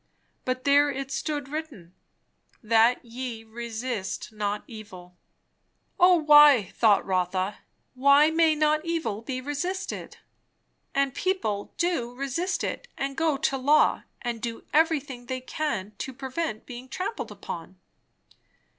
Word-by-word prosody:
But 255 0 -2
there 285 +1 +5
it 275 0 -4
stood 290 -3 -2
written 275 - -7 0.7
"That 230 +3 +3
ye 235 -1 -6
resist 225 -2 -5
not 210 -1 -2
evil." 185 -6 -11 0.8
"O 360 0 +7
why, 295 - +7
thought 215 -3 +4
Rotha, 185 +1 -1 0.3
why 280 +4 +5
may 320 -1 +4
not 305 0 +2
evil 330 -11 -2
be 255 +2 -4
resisted? 320 +8 -4 0.8
And 275 -1 +2
people 245 - -2
do 285 -9 -1
resist 275 +8 -2
it, - - -4
and 275 0 -3
go 320 -2 +1
to 270 0 0
law, 285 +4 +4 0.2
and 240 -2 -3
do 230 -1 -5
everything 290 -6 +1
they 260 -1 -3
can, 250 -7 -3
to 265 - -4
prevent 265 -2 -4
being 250 +1 -9
trampled 375 - -4
upon? 175 +2 -8
260 Hz, 125 wpm, -26 LUFS, 225-300 Hz, 0.8 s, O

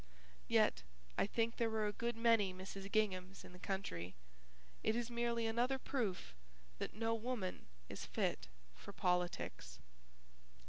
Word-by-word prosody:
Yet 65 - +4 0.3
I - - +3
think 230 +2 +1
there 230 -1 +3
were 220 -1 +1
a 210 - +1
good 235 +2 -1
many 230 -4 +5
Mrs. 195 +1 -6
Ginghams 190 -3 +1
in - - -11
the 180 - -11
country. 95 - -3 0.7
It 220 - +2
is 240 0 -1
merely 235 -1 +1
another 240 +4 +2
proof 215 - -1 0.5
that - - -3
no 225 +1 +1
woman 225 - -2 0.2
is - - -6
fit - - 0 0.3
for - - -10
politics. 180 - 0
215 Hz, 140 wpm, -39 LUFS, 185-235 Hz, 0.7 s, many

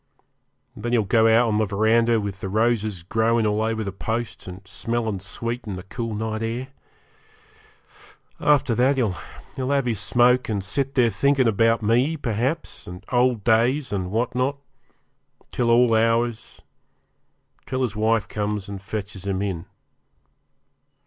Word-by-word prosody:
And 105 - -12
then 120 0 -2
he'll 115 -3 +3
go 110 +3 +3
out 115 +2 +5
in 105 - +1
the 110 - +2
verandah, 115 +3 +3
with 100 -2 -5
the 95 - -4
roses 110 -3 0
growin' 115 +4 +1
all 105 0 +1
over 110 0 -1
the 100 - -4
posts 115 +4 -4
and 95 +1 -10
smellin' 110 0 -2
sweet 115 +5 -5
in 100 - -4
the 90 - -7
cool 115 +2 -5
night 110 +1 -3
air. 120 +4 -3 1.7
After 145 -5 +3
that 130 +4 +2
he'll 115 - -4
have 140 -2 +1
his 115 -5 -1
smoke, 125 +1 +3
and 100 -3 -1
sit 135 +7 -2
there 120 -4 +4
thinkin' 140 -1 +2
about 115 +1 +2
me, 125 +9 +2
perhaps, 130 +5 -3
and 90 +2 -9
old 125 -3 +2
days, 120 +3 +2
and 95 -2 -2
what 115 +5 -1
not, 130 +3 0 0.9
till 120 -1 0
all 120 0 +5
hours 115 +1 0 1.0
till 130 0 -1
his 110 -5 -2
wife 110 0 +1
comes 105 -1 -3
and 100 -1 -7
fetches 100 -1 -6
him 95 -1 -1
in. 95 -3 -4
115 Hz, 155 wpm, -23 LUFS, 105-120 Hz, 1.7 s, out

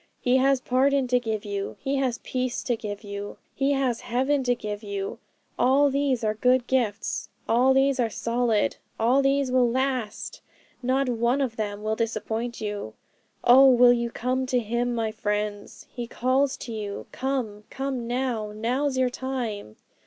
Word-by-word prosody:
He 250 +1 +3
has 270 0 +3
pardon 270 +1 +2
to 250 0 +4
give 220 -3 -3
you, 200 -1 -4
He 275 +1 -1
has 255 -3 0
peace 255 -1 -2
to 245 - 0
give 210 -2 -6
you, 200 0 -6 0.2
He 280 +1 +1
has 260 -4 0
heaven 265 +4 +1
to 245 0 +2
give 210 -3 -5
you. 200 -2 -4 0.4
All 275 +3 +4
these 270 -3 0
are 215 -1 +1
good 250 +3 +2
gifts, 230 -5 -1 0.2
all 245 +3 +4
these 270 0 +3
are 235 -2 +2
solid, 230 -1 0 0.2
all 245 +5 +4
these 275 -1 +1
will 250 -2 +4
last, 255 -3 -2 0.4
not 260 +2 +1
one 240 +2 +1
of 260 -5 -1
them 210 -1 -4
will 215 0 0
disappoint 230 +1 -3
you. 205 - -5 0.5
'Oh, 265 +3 +8
will 245 -1 +7
you 235 -1 -1
come 255 +3 -1
to 255 - +1
Him, 240 +1 -1
my 225 -1 -1
friends? 210 -1 -3
He 240 -2 -5
calls 260 +3 +1
to 240 - -7
you 205 -2 -5
"Come! 245 -6 -3
come 265 -3 -3
now!" 240 -4 -2
Now's 255 +6 -1
your 255 -1 +2
time! 240 - -4
245 Hz, 165 wpm, -26 LUFS, 220-260 Hz, 0.5 s, Oh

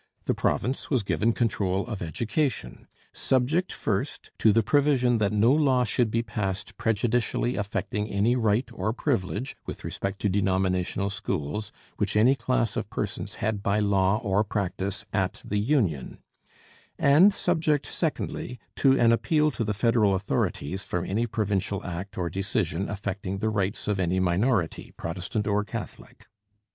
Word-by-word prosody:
The - - +1
province 130 +3 -1
was 130 -7 +1
given 110 +3 +1
control 100 -5 0
of 110 -4 -5
education, 110 - -2 0.3
subject, 140 +8 +1
first, - - -3
to 110 - +5
the 115 +2 +3
provision 130 -3 +3
that 105 -1 +2
no 105 +3 +4
law 135 -4 +3
should 120 +1 +1
be 115 +2 0
passed 100 -4 -3
prejudicially 120 +2 0
affecting 105 0 -2
any 105 +5 +2
right 115 +1 +2
or 110 +1 -1
privilege, 120 -2 -2
with - - -6
respect 100 0 -4
to - - +2
denominational 95 0 0
schools, 95 +1 -3 0.3
which - - 0
any 120 +5 +6
class 120 -4 0
of 100 - -3
persons 100 -1 -4
had 110 -2 -2
by 100 +1 +1
law 100 -1 +3
or 100 0 +2
practice 100 -1 -3
at 95 -3 0
the 105 - -1
union, 105 - 0 0.8
and 155 +9 +6
subject, 160 -6 +1
secondly, 125 - -3 0.2
to 135 -1 +4
an 115 -1 +5
appeal 150 +6 +2
to 120 - -2
the 105 -1 -1
federal 105 -2 +3
authorities 95 -2 -2
from 90 -2 -2
any 115 +5 0
provincial 100 -3 -1
act 90 +2 -6
or 90 -2 -1
decision 95 0 -1
affecting 100 -1 -4
the 110 +2 0
rights 100 -1 -1
of 105 -2 0
any 90 0 +1
minority, 95 +1 0
Protestant 95 +6 -3
or 105 0 +1
Catholic. 105 -3 -8
105 Hz, 150 wpm, -26 LUFS, 95-120 Hz, 0.8 s, any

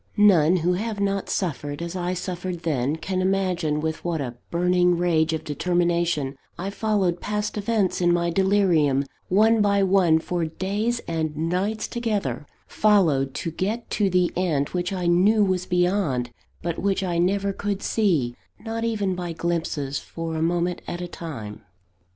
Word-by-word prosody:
None 185 -5 +5
who 175 +1 +1
have 210 +3 -3
not 200 -1 -1
suffered 145 -5 -2
as 170 +1 -5
I 180 0 -1
suffered 180 -1 -4
then, 145 -2 0
can 185 +3 -2
imagine 185 -5 0
with 160 0 -3
what 170 -2 -1
a 125 -4 -3 0.2
burning 180 0 +2
rage 165 -2 +2
of 160 - -2
determination 170 -2 0 0.2
I 190 +3 -4
followed 200 -5 0
past 210 0 -2
events 210 -3 0
in 175 0 +4
my 170 0 +1
delirium, 170 -7 +3 0.2
one 220 +4 +4
by 200 -1 +3
one, 185 -4 +4
for 170 +1 -2
days 205 +8 -1
and 160 -2 -2
nights 185 +7 -1
together, 205 - -2 0.2
followed, 160 -11 +2
to 165 - -3
get 210 +8 -3
to 205 -2 +2
the 180 -1 +2
end 160 -6 0
which 180 0 -2
I 185 -2 -2
knew 195 +5 +4
was 185 -2 0
beyond, 175 -9 +1 0.3
but 170 -1 -2
which 195 0 0
I 175 -2 -1
never 195 +3 +1
could 200 0 -3
see, 165 - +1 0.3
not 225 0 -4
even 210 -4 0
by 175 -2 -4
glimpses, 160 -4 -2
for 165 -1 -6
a 160 - -2
moment 175 +1 0
at 175 - -4
a 175 - -4
time. 130 -13 -7
180 Hz, 160 wpm, -24 LUFS, 160-195 Hz, 0.3 s, None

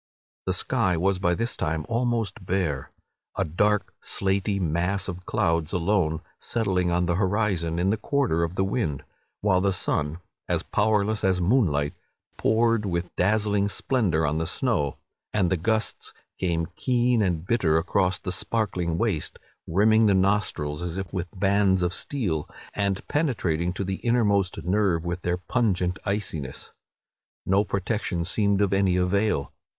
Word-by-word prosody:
The 95 - +2
sky 95 -2 +1
was 95 +2 +1
by 90 -2 +2
this 115 +3 -1
time 80 -1 -2
almost 115 -4 -1
bare, 85 -8 -1 0.5
a - - +1
dark 105 +6 +1
slaty 100 +1 0
mass 90 +3 0
of 90 -1 -7
clouds 85 -6 0
alone 90 -3 +1 0.2
settling 95 -6 0
on 90 +1 +1
the 85 0 0
horizon 95 -4 0
in 90 +3 +2
the 110 - +1
quarter 110 - +1
of 85 +2 -3
the 95 - +1
wind; 95 - -1 0.4
while 95 -3 +3
the 100 0 +2
sun, 75 -4 -1 0.3
as - - +1
powerless 105 0 +1
as 95 -1 +2
moonlight, 85 - +2 0.4
poured 115 0 +2
with 90 -3 -3
dazzling 105 +1 +2
splendour 100 - +1
on 75 +2 0
the 80 - -1
snow; 70 -3 0 0.4
and 95 -5 +2
the - - +4
gusts 110 +6 -1 0.2
came 85 -3 0
keen 125 -2 +2
and 90 -4 0
bitter 95 -8 +2
across 90 +2 +1
the 90 - -5
sparkling 90 -4 -1
waste, 100 -7 -1 0.3
rimming 110 +5 +4
the 100 - +4
nostrils 95 -6 0
as 90 0 -3
if 95 -2 -5
with 90 -2 -2
bands 95 -1 +3
of 90 0 0
steel, 95 - -2 0.2
and 100 -2 -1
penetrating 95 - 0
to 95 +2 -3
the 95 0 -2
innermost 105 -6 +1
nerve 90 -3 +1
with 85 +1 -3
their 90 0 0
pungent 90 -3 0
iciness. 95 -9 -3 0.7
No 95 +2 +3
protection 100 -3 -2
seemed 100 +1 +1
of 100 -1 +2
any 95 -2 +3
avail. 90 -3 +1
95 Hz, 150 wpm, -25 LUFS, 85-105 Hz, 0.7 s, the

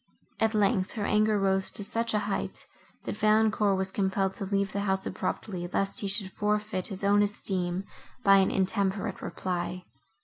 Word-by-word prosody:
At 220 0 +2
length, 195 -2 +2
her 210 -3 -2
anger 215 0 +3
rose 190 -1 +2
to 205 - -4
such 230 +2 -1
a 210 -1 0
height, 205 - -3 0.4
that - - -4
Valancourt 215 -2 +3
was 190 0 -1
compelled 190 -1 0
to 195 - -5
leave 200 0 0
the 200 - -2
house 190 -1 0
abruptly, 185 -1 -3
lest 195 0 0
he 200 - -1
should 195 -1 0
forfeit 210 -2 -1
his 195 -2 -6
own 205 +1 +4
esteem 190 -3 -1 0.4
by 195 0 +7
an 190 -1 +4
intemperate 195 0 0
reply. 180 0 -3
195 Hz, 170 wpm, -28 LUFS, 190-210 Hz, 0.4 s, by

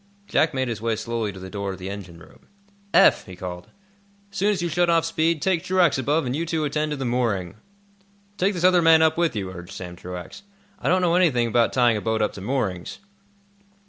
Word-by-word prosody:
Jack 160 - +2
made 130 0 0
his 115 -3 -4
way 115 -1 0
slowly 115 -1 -3
to 95 - -11
the 95 0 -9
door 100 -1 -3
of 95 - -7
the 90 +1 -7
engine 95 -4 -9
room. 85 - -18 0.4
"Eph," - - +5
he 90 - -9
called, 90 -1 -7 0.6
"as 195 - -10
soon 200 +2 +2
as 205 -4 0
you've 175 -1 -2
shut 175 +1 +2
off 165 -1 +3
speed, 165 -1 0
take 185 -4 +1
Truax 180 -7 +2
above 145 +4 0
and 125 +1 -2
you 160 - -1
two 160 -2 -1
attend 150 +1 -1
to 150 - -3
the 135 - -4
mooring." 115 -8 -1 0.8
"Take 195 +1 0
this 175 - -3
other 180 -1 +5
man 165 -1 +6
up 160 0 +3
with 170 -7 0
you," 95 -3 -3
urged 90 0 -10
Sam 90 -2 -8
Truax. 90 - -9 0.4
"I - - -1
don't 185 +1 +3
know 170 -1 +2
anything 150 -10 +3
about 115 +1 +2
tying 120 -3 +3
a - - -4
boat 110 0 0
up - - -1
to 100 - -9
moorings." 95 -6 -3
125 Hz, 230 wpm, -23 LUFS, 100-165 Hz, 0.8 s, man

